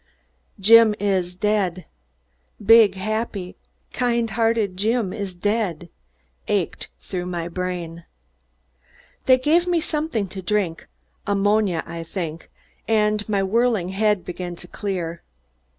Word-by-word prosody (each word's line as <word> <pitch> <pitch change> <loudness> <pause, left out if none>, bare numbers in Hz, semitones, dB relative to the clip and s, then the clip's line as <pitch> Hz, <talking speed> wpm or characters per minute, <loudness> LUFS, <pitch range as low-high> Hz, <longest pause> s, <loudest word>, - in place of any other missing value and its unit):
"Jim 225 +1 +7
is 185 -3 0
dead 190 -3 0 0.8
big, 220 -2 +7
happy, 205 -2 -3 0.4
kind 235 -2 0
hearted 225 -4 +1
Jim 215 0 0
is 200 -4 -5
dead" 185 -4 -1 0.6
ached - - -1
through 180 - -5
my 170 -2 -3
brain. 175 -2 -4 1.2
They 255 -1 +7
gave 320 +7 +2
me 350 -1 +2
something 300 -10 -2
to 190 +1 -7
drink 185 -4 -1 0.4
ammonia, 200 -3 +2
I 170 0 -6
think 165 -2 -6 0.4
and 210 -1 +1
my 200 -2 +1
whirling 220 -2 +1
head 205 0 +1
began 180 0 -5
to 175 - -11
clear. 175 -4 -4
200 Hz, 115 wpm, -22 LUFS, 180-225 Hz, 1.2 s, Jim